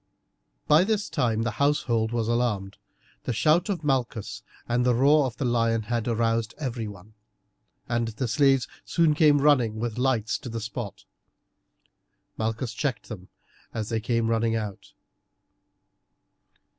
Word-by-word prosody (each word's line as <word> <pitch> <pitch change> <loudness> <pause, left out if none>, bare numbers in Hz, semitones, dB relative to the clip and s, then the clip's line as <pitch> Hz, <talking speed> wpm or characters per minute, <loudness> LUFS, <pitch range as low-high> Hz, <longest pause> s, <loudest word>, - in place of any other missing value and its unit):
By 155 +4 +6
this 210 0 -1
time 115 -2 0
the 120 - -1
household 120 -6 +1
was 115 -2 -1
alarmed, 115 -5 -1 0.5
the - - -1
shout 155 - +2
of 185 -5 -2
Malchus 120 -7 -1 0.3
and 120 +1 +1
the 125 -1 +3
roar 140 +3 +4
of 120 - -8
the 140 - -2
lion 115 -2 +1
had 115 +1 -2
aroused 115 -1 0
everyone, 110 - -6 0.7
and 115 0 0
the 115 +3 -3
slaves 135 +1 +3 0.2
soon 165 -3 +2
came 150 -1 +5
hurrying 135 -6 +3
with 115 +1 -3
lights 125 -4 0
to 125 - -8
the 115 0 -4
spot. 115 -2 -6 1.3
Malchus 110 +2 -2
checked 130 -2 -3
them 95 -5 -8 0.5
as 110 -2 -3
they 115 -1 0
came 115 0 0
running 115 0 +1
out. 105 -3 -5
120 Hz, 140 wpm, -26 LUFS, 110-135 Hz, 1.3 s, By